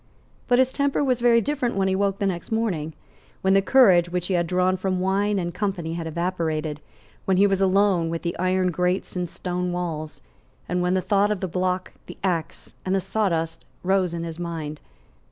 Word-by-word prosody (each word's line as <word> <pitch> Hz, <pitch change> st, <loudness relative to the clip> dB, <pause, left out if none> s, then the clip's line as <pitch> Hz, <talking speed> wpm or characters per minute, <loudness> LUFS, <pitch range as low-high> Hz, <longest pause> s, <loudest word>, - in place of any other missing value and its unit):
But 245 Hz, -, +4 dB
his 260 Hz, 0 st, +3 dB
temper 280 Hz, +1 st, 0 dB
was 255 Hz, -3 st, +1 dB
very 235 Hz, -1 st, +5 dB
different 265 Hz, -3 st, -1 dB
when 195 Hz, -1 st, +1 dB
he 190 Hz, -, +1 dB
woke 195 Hz, 0 st, 0 dB
the 200 Hz, -, -1 dB
next 180 Hz, -1 st, -3 dB
morning, 185 Hz, -9 st, -1 dB, 0.5 s
when 190 Hz, 0 st, +4 dB
the 195 Hz, -, +5 dB
courage 190 Hz, -7 st, +5 dB
which 180 Hz, 0 st, -2 dB
he 190 Hz, -, -1 dB
had 175 Hz, -1 st, +1 dB
drawn 185 Hz, +1 st, +2 dB
from 185 Hz, 0 st, -1 dB
wine 200 Hz, +2 st, +1 dB
and 175 Hz, -2 st, -2 dB
company 180 Hz, -4 st, -2 dB
had 165 Hz, -1 st, -4 dB
evaporated, 160 Hz, -3 st, -2 dB, 0.4 s
when 190 Hz, -1 st, +2 dB
he 200 Hz, -, +6 dB
was 195 Hz, -1 st, +1 dB
alone 190 Hz, -3 st, +3 dB
with 165 Hz, 0 st, -4 dB
the 170 Hz, -, -2 dB
iron 185 Hz, 0 st, +1 dB
grates 180 Hz, +3 st, -1 dB
and 180 Hz, -1 st, -2 dB
stone 180 Hz, 0 st, -3 dB
walls, 160 Hz, -4 st, -4 dB, 0.5 s
and 180 Hz, +1 st, 0 dB
when 180 Hz, +1 st, +1 dB
the 185 Hz, -, +1 dB
thought 200 Hz, +1 st, +3 dB
of 210 Hz, -2 st, -1 dB
the 190 Hz, -, -2 dB
block, 185 Hz, +1 st, -1 dB, 0.2 s
the -, -, -9 dB
axe 170 Hz, -4 st, -2 dB
and 190 Hz, +1 st, 0 dB
the -, -, +2 dB
sawdust 175 Hz, -5 st, -1 dB, 0.2 s
rose 190 Hz, -1 st, +2 dB
in 170 Hz, -, -4 dB
his 165 Hz, 0 st, -6 dB
mind. 160 Hz, -3 st, -5 dB
185 Hz, 205 wpm, -24 LUFS, 170-195 Hz, 0.5 s, he